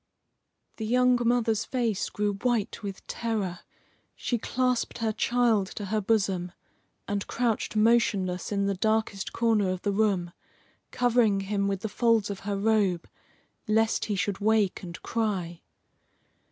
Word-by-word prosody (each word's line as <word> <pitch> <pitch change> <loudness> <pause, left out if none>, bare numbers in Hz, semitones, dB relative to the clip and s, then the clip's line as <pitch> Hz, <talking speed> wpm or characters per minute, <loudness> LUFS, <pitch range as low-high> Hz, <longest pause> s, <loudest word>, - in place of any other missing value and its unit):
The 220 - -4
young 250 +1 +4
mother's 230 -2 +2
face 235 -6 -1
grew 205 0 -1
white 235 +1 -1
with 200 -2 -7
terror. 205 -7 -3 0.6
She 240 - -2
clasped 250 +1 -1
her 225 -2 0
child 230 -3 +2
to 205 - -4
her 215 +2 -1
bosom, 195 -4 0 0.5
and 200 0 -2
crouched 230 -3 -1
motionless 215 -5 +2
in 200 -1 +1
the 200 - +1
darkest 215 0 0
corner 220 -4 +2
of 185 -1 -3
the 205 - +1
room, 195 -4 +1 0.6
covering 235 -5 +2
him 200 0 -1
with 195 -1 -2
the - - -2
folds 225 -1 +2
of 195 - -6
her 200 - 0
robe, 200 -4 +1 0.6
lest 220 +1 +2
he 210 - -1
should 195 0 -1
wake 215 -2 +2
and 175 -3 -8
cry. 190 -7 -2
210 Hz, 140 wpm, -27 LUFS, 195-230 Hz, 0.6 s, young